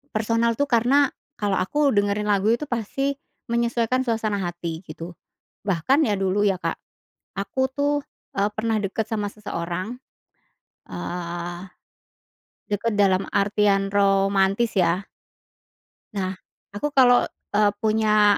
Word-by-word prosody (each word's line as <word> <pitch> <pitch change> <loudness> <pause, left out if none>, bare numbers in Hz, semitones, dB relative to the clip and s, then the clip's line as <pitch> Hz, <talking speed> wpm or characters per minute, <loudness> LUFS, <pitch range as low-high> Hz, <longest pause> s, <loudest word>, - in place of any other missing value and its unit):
Personal 230 +1 +1
tuh 285 - +2
karena, 260 +3 +4 0.3
kalau 205 -2 0
aku 280 +10 +1
dengerin 205 +1 +1
lagu 205 0 +2
itu 240 +6 0
pasti 270 +3 -1 0.3
menyesuaikan 235 +1 +1
suasana 220 -4 -1
hati 175 -2 -4
gitu. 165 +2 -8 0.5
Bahkan 205 - +2
ya 210 -3 +1
dulu 195 +1 +1
ya 195 -2 +2
Kak, - - -2 0.6
aku 200 +6 -3
tuh, 285 +1 +1 0.4
eee, 200 +1 +2
pernah 220 +1 0
deket 210 +1 -2
sama 210 -2 -1
seseorang. 185 +1 -4 0.9
Eee, 175 0 -5 1.1
deket 210 +2 0
dalam 195 -1 +3
artian 200 -1 +2
romantis 195 +2 +3
ya. 180 +2 +2 1.1
Nah 185 -1 -1 0.4
aku 205 +9 -2
kalau, 250 -3 +6 0.3
eee, 205 0 +4
punya 215 -1 +4
205 Hz, 120 wpm, -24 LUFS, 195-230 Hz, 1.1 s, kalau